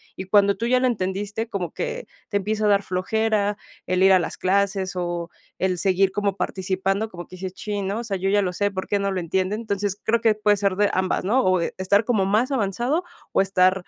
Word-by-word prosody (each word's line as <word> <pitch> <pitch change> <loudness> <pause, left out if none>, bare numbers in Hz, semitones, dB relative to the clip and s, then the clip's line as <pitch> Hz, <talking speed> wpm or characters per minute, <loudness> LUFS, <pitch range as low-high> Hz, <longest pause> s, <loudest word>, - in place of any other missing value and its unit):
y 190 - -6
cuando 200 +1 +4
tú 230 - -3
ya 250 +1 +3
lo 255 - +2
entendiste, 205 +1 -2
como 185 -5 -3
que - - -4 0.2
te 205 - +1
empieza 215 +2 -1
a - - +4
dar 200 0 +3
flojera 205 +2 0 0.3
el 185 0 +1
ir 190 0 +7
a 185 - +6
las 175 - -4
clases, 195 0 0
o 175 -1 -3 0.3
el 185 -1 0
seguir 190 +2 +2
como 200 -1 -1
participando, 195 +3 -1
como 175 -3 -9
que 185 - -11
dices: 185 0 -5
"Chin, 205 -1 -4
¿no?, 205 +4 -2
osea, 220 -5 -3
yo 190 +1 -1
ya 205 +1 +3
lo 180 -2 -1
sé, 205 +2 0
¿por 190 -1 -5
qué 205 - +1
no 200 0 0
lo 190 - -1
entienden?", 185 +4 -1
entonces, 205 -2 -2
creo 230 +1 +1
que 225 -2 +3
puede 210 -1 +2
ser 200 -1 +1
de 205 +1 +3
ambas, 185 0 0
¿no?, 250 +7 +3
o 185 -1 +3
de 170 - -2
estar 200 +3 +2
como 215 -6 +2
más 215 +7 +1
avanzado, 245 - 0 0.3
o - - +3
estar 185 -1 +3
200 Hz, 235 wpm, -23 LUFS, 185-215 Hz, 0.3 s, ir